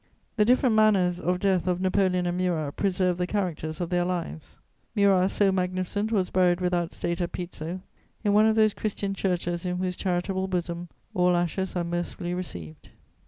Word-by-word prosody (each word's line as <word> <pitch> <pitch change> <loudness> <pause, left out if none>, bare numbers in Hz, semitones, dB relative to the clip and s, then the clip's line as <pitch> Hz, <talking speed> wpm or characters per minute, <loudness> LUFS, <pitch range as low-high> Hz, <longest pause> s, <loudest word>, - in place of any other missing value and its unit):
The 210 - +3
different 250 0 +4
manners 195 -5 +3
of 180 +1 0
death 190 -2 +1
of 180 -1 +1
Napoleon 185 -1 +1
and 175 0 -1
Murat 170 -5 -1
preserve 180 -2 0
the 180 - 0
characters 170 -6 -2
of 175 -1 -3
their 175 0 +2
lives. 175 -3 -4 0.4
Murat, 195 -2 +4
so 200 -1 +2
magnificent, 185 +3 -1
was 190 -5 +1
buried 180 -1 +3
without 175 -2 0
state 170 +1 -3
at 175 - -1
Pizzo, 175 0 -5 0.4
in 205 -2 +2
one 215 +1 +6
of 220 - +3
those 215 -2 +4
Christian 200 -2 -3
churches 175 -3 -1
in 180 -1 -2
whose 180 0 -2
charitable 190 +1 -1
bosom 175 -1 -3 0.2
all 180 0 +3
ashes 180 +2 -1
are 175 - 0
mercifully 175 +1 -3
received. 85 - -7
180 Hz, 175 wpm, -26 LUFS, 175-195 Hz, 0.4 s, one